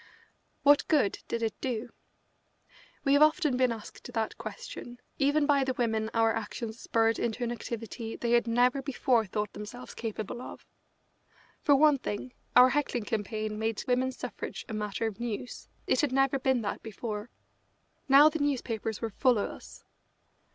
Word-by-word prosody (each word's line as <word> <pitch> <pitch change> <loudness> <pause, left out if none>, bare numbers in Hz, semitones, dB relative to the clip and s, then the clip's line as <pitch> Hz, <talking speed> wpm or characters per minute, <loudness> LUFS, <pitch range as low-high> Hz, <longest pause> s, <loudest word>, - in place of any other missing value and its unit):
What 290 0 +5
good 285 -10 +2
did 230 0 -2
it 225 - 0
do? 245 -2 -3 1.1
We 275 - +3
have 285 - +5
often 305 -2 +4
been 255 -1 +3
asked 230 +2 -8
that 225 -2 -2
question, 230 +3 -8 0.2
even 290 +1 +3
by 285 -2 +3
the 260 -1 -1
women 220 -3 0
our 225 0 +4
actions 225 +1 -5
spurred 225 0 +1
into 235 +1 -1
an 240 - -1
activity 230 -1 -5
they 235 - -2
had 240 -1 +4
never 245 +3 +3
before 255 -4 +1
thought 210 +2 -3
themselves 210 +4 -8
capable 225 +1 -5
of. - - -9 1.0
For 285 - +5
one 295 0 +5
thing, 245 +2 -5 0.2
our 250 +1 +9
heckling 255 -3 0
campaign 215 0 -3
made 220 -1 -1
women's 255 +1 +1
suffrage - - -6
a 225 - -6
matter 210 +1 -2
of 220 -1 -4
news 240 +1 -5 0.2
it - - +2
had 295 -4 +1
never 270 +1 +2
been 260 -3 +1
that 205 - -3
before. 215 0 -5 0.8
Now 280 +3 +9
the 315 +1 0
newspapers 235 -6 -2
were 225 -1 -2
full 250 +3 +3
of 205 - -1
us. - - -12
240 Hz, 165 wpm, -29 LUFS, 220-265 Hz, 1.1 s, our